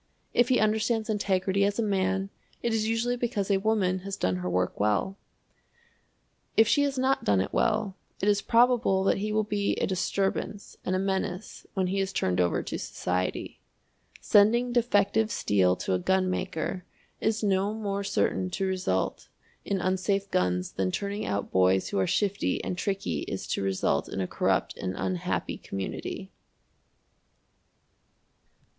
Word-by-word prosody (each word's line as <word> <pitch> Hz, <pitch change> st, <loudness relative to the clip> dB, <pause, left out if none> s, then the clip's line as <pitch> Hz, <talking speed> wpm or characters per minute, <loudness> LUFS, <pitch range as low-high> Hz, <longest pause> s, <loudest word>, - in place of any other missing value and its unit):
If 240 Hz, 0 st, +3 dB
he 255 Hz, -, +4 dB
understands 220 Hz, +1 st, +1 dB
integrity 195 Hz, -1 st, +1 dB
as 200 Hz, 0 st, +1 dB
a 230 Hz, -, +1 dB
man, 195 Hz, -1 st, 0 dB, 0.3 s
it 235 Hz, -, +1 dB
is 220 Hz, -1 st, +1 dB
usually 235 Hz, +2 st, 0 dB
because 220 Hz, -5 st, -1 dB
a 195 Hz, -, +3 dB
woman 195 Hz, -3 st, +1 dB
has 195 Hz, +1 st, -5 dB
done 90 Hz, 0 st, 0 dB
her 90 Hz, 0 st, -3 dB
work 90 Hz, 0 st, -1 dB
well. 105 Hz, -, +1 dB, 1.4 s
If 220 Hz, -, +7 dB
she 285 Hz, -, +4 dB
has 280 Hz, -1 st, 0 dB
not 265 Hz, +1 st, +1 dB
done 100 Hz, -2 st, +3 dB
it 95 Hz, -, -2 dB
well, 215 Hz, -4 st, +1 dB, 0.2 s
it 200 Hz, -, -1 dB
is 205 Hz, -1 st, +3 dB
probable 235 Hz, -5 st, +3 dB
that 195 Hz, -, +2 dB
he 210 Hz, +2 st, -2 dB
will 215 Hz, 0 st, +2 dB
be 205 Hz, -1 st, 0 dB
a -, -, 0 dB
disturbance 195 Hz, +2 st, -2 dB
and 185 Hz, -, 0 dB
a -, -, +2 dB
menace 190 Hz, 0 st, -3 dB
when 190 Hz, -1 st, +1 dB
he 190 Hz, +2 st, -1 dB
is 195 Hz, 0 st, -1 dB
turned 90 Hz, -, +1 dB
over 85 Hz, -1 st, +1 dB
to -, -, -4 dB
society. 90 Hz, +1 st, -3 dB, 0.6 s
Sending 235 Hz, +4 st, +4 dB
defective 220 Hz, -2 st, +2 dB
steel 95 Hz, -, +2 dB
to 95 Hz, -, -2 dB
a 90 Hz, -, +1 dB
gunmaker 185 Hz, -, -1 dB, 0.4 s
is 220 Hz, 0 st, 0 dB
no 195 Hz, 0 st, +2 dB
more 200 Hz, -2 st, -3 dB
certain 185 Hz, -1 st, 0 dB
to 190 Hz, +2 st, -2 dB
result 185 Hz, -, -1 dB, 0.4 s
in 195 Hz, -, 0 dB
unsafe 190 Hz, +2 st, 0 dB
guns 90 Hz, 0 st, 0 dB
than 95 Hz, -1 st, -1 dB
turning 200 Hz, -, -3 dB
out 100 Hz, 0 st, -2 dB
boys 95 Hz, 0 st, +3 dB
who 100 Hz, -, -1 dB
are 95 Hz, -, +2 dB
shifty 200 Hz, -1 st, 0 dB
and -, -, -2 dB
tricky 195 Hz, +1 st, -2 dB
is 95 Hz, -, -4 dB
to -, -, -1 dB
result 95 Hz, -1 st, 0 dB
in -, -, -4 dB
a 95 Hz, -, 0 dB
corrupt -, -, 0 dB
and 95 Hz, 0 st, -3 dB
unhappy 95 Hz, -2 st, -2 dB
community. 95 Hz, -1 st, -5 dB
195 Hz, 160 wpm, -28 LUFS, -, 1.4 s, If